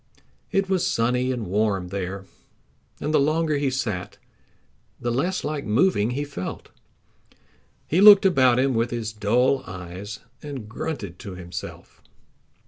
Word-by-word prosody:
It 195 0 +1
was 185 -2 +1
sunny 125 +2 +1
and 120 -4 -3
warm 100 -1 0
there, 95 0 -4 0.7
and 155 - -2
the - - +5
longer 155 +1 +1
he 140 -1 +1
sat 110 -9 -3 0.8
the 120 - -2
less 175 +10 -1
like 150 -1 -3
moving 115 - +2
he 135 +4 -2
felt. 140 -11 -6 1.2
He 175 +5 +1
looked 205 -1 +9
about 130 -9 +4
him 135 +1 +2
with 115 +1 +1
his 115 -2 -4
dull 120 +6 +2
eyes 90 +3 -8 0.2
and 140 -7 -7
grunted 110 - -5
to 95 -2 -8
himself. 90 -1 -9
120 Hz, 135 wpm, -24 LUFS, 100-145 Hz, 1.2 s, looked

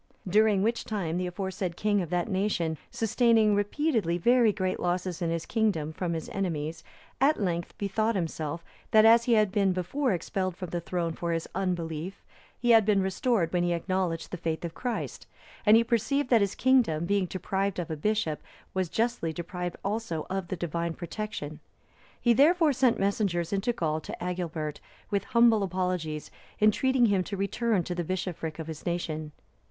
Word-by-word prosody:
During 205 0 +4
which 230 +2 0
time, 190 -8 -2
the 180 - -1
aforesaid 185 -1 -4
king 205 -1 +2
of 170 - -4
that 175 0 0
nation, 190 -6 -1
sustaining 225 -1 +3
repeatedly 205 - +1
very 235 +4 +4
great 185 -2 -2
losses 180 0 -2
in 170 - 0
his 165 -1 -2
kingdom 195 -9 0
from 170 +1 -2
his 160 -1 -4
enemies, 165 -4 -3 0.4
at 290 +3 +4
length 175 -4 -2
bethought 215 +3 0
himself, 165 -2 -3 0.2
that 215 0 +6
as 230 +1 +7
he 240 - +3
had 215 -3 +4
been 195 -2 +2
before 235 - -1
expelled 185 0 -2
from 180 -3 -6
the 175 - -2
throne 170 -1 -2
for 170 +1 -3
his 165 0 -2
unbelief, 175 -1 -3 0.4
he 240 -1 +3
had 225 -1 +7
been 205 -1 +3
restored 190 -2 0
when 175 - +2
he 175 0 +1
acknowledged 170 -1 -2
the 180 - -4
faith 165 0 -3
of 165 - -5
Christ; 245 +3 -4 0.4
and 215 +1 +8
he 230 - +4
perceived 250 +4 0
that 230 -3 +6
his 200 -1 0
kingdom, 235 -12 +3
being 195 0 +1
deprived 195 +2 -2
of 170 -3 -3
a - - -1
bishop, 165 -2 -1 0.3
was 185 -2 -1
justly 230 -5 0
deprived 175 +2 -5
also 200 -6 -2
of 190 -2 -2
the 185 - -3
Divine 170 0 -2
protection. 170 -5 -5 0.6
He, 240 - +4
therefore, 310 +4 +5
sent 255 -2 +3
messengers 195 -3 0
into 200 +5 +1
Gaul 160 -9 -1
to - - -7
Agilbert, 165 -4 -3 0.3
with 200 -1 0
humble 235 -2 +4
apologies 180 -5 -2 0.3
entreating 245 +4 +4
him 200 -4 +2
to 200 - -4
return 200 0 0
to 180 - -4
the 175 0 -2
bishopric 170 -3 -3
of 160 - -5
his 160 -1 -7
nation. 155 -3 -3
185 Hz, 180 wpm, -28 LUFS, 170-215 Hz, 0.6 s, and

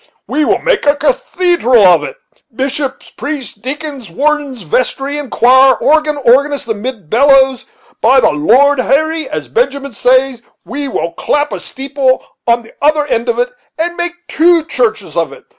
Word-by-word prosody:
we 305 - -1
will - - +2
make - - -1
a 285 - +4
cathedral 345 - +1
of 180 -2 +5
it! - - -6 0.4
bishops, 270 +2 -4
priests, 285 -6 -5
deacons, 265 - -7
wardens, 285 - -2
vestry, 270 - -2
and 285 -3 -7
choir; 260 +2 +5
organ, 305 0 +1
organist, 280 +1 +2
amid 220 -3 -5
bellows! 265 - +3 0.4
By 260 +4 +5
the - - +3
Lord 255 - +3
Harry, 315 +5 0
as - - -5
Benjamin 280 - -2
says, 255 +2 +1 0.2
we 280 +4 -4
will 170 -9 -3
clap 295 - -1
a - - -4
steeple 270 -1 -1 0.2
on 235 0 +2
the 225 - -17
other 300 0 +2
end 235 -3 -2
of 235 - 0
it, 245 +1 -1 0.3
and 345 +2 -2
make 345 0 -3
two 335 0 +3
churches 440 +5 -2
of - - -1
it. - - -13
275 Hz, 160 wpm, -13 LUFS, 245-300 Hz, 0.4 s, of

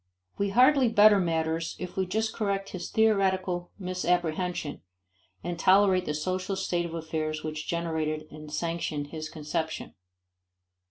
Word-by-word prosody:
We 200 0 +1
hardly 255 +4 +5
better 210 -2 +7
matters 165 -1 -1
if 180 - -6
we 190 -1 0
just 220 +4 -1
correct 200 -2 -1
his 180 -2 -6
theoretical 190 -5 +2
misapprehension, 180 -4 -1 0.6
and 175 -1 -4
tolerate 190 -1 +5
the 150 - -1
social 185 +5 -2
state 175 -3 -1
of 165 - -7
affairs 155 -1 -3
which 155 0 -5
generated 160 -2 -2
and 150 0 -10
sanctioned 155 -2 -2
his 155 -1 -6
conception. 160 +1 -4
175 Hz, 130 wpm, -28 LUFS, 160-195 Hz, 0.6 s, better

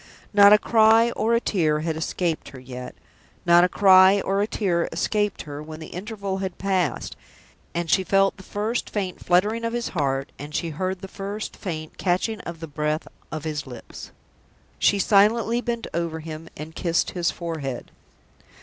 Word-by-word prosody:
Not 205 0 +8
a 210 - +9
cry 225 +1 +4
or 230 0 +1
a - - +3
tear 155 -9 +1
had 160 0 -2
escaped 165 +1 -2
her 130 - -11
yet. 125 0 -8 0.5
Not 175 0 +6
a 180 - +3
cry 190 +1 +6
or 195 +1 0
a 205 - +1
tear 180 -6 0
escaped 210 -2 -1
her 145 0 -7
when 155 +1 -9
the 160 - -9
interval 200 0 -4
had 190 -2 -4
passed, 185 -7 -1 0.6
and 170 0 -1
she 190 +4 +3
felt 195 +1 +3
the - - -13
first 210 +5 -3
faint 190 -4 -4
fluttering 210 +6 +2
of 230 0 -2
his 240 0 -2
heart, 135 -4 -1
and 150 +2 -7
heard 185 +3 -3
the 195 - -6
first 200 +2 -6
faint 155 -5 -6
catching 190 +4 0
of 170 -1 -8
the 165 - -5
breath 150 +1 -2 0.2
of 155 -1 -5
his 150 -3 -4
lips. 125 -2 -10 0.7
She 205 - +4
silently 220 +4 +3
bent 235 -2 -3
over 165 -1 -2
him 160 +1 -8
and 155 +1 -8
kissed 170 0 0
his 175 -2 0
forehead. 155 -7 -5
180 Hz, 175 wpm, -24 LUFS, 160-205 Hz, 0.7 s, a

